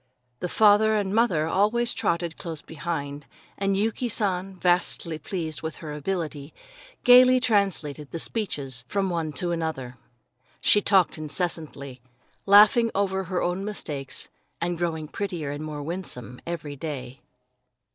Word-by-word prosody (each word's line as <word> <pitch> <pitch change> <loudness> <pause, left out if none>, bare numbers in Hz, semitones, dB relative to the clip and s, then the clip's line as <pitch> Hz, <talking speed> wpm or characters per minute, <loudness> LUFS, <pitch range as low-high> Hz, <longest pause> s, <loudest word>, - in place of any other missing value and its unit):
The 180 - -3
father 215 +2 +5
and 200 -2 0
mother 210 -9 +3
always 215 +8 +2
trotted 170 -1 -1
close 165 -3 -7
behind, 145 -3 -5 0.3
and 195 0 0
Yuki 225 +4 0
San, 195 -3 0
vastly 175 -2 +1
pleased 160 -5 -4
with 160 0 -4
her 155 -2 -7
ability, 150 -2 -4 0.5
gaily 255 +1 +8
translated 185 - 0
the - - -5
speeches 140 - -2
from 195 -2 -1
one 165 -3 -2
to 175 +3 -2
another. 155 -7 -3 0.6
She 205 - +4
talked 190 -5 +3
incessantly, 150 -5 -4 0.5
laughing 210 +4 +7
over 190 -1 0
her 180 0 -1
own 180 +2 -1
mistakes, 150 -10 -5 0.3
and 175 +1 -1
growing 165 -2 -2
prettier 175 -5 -4
and 145 +1 -5
more 150 -2 -5
winsome 135 - -6
every 160 -4 -4
day. 135 -3 -6
170 Hz, 135 wpm, -25 LUFS, 150-200 Hz, 0.6 s, gaily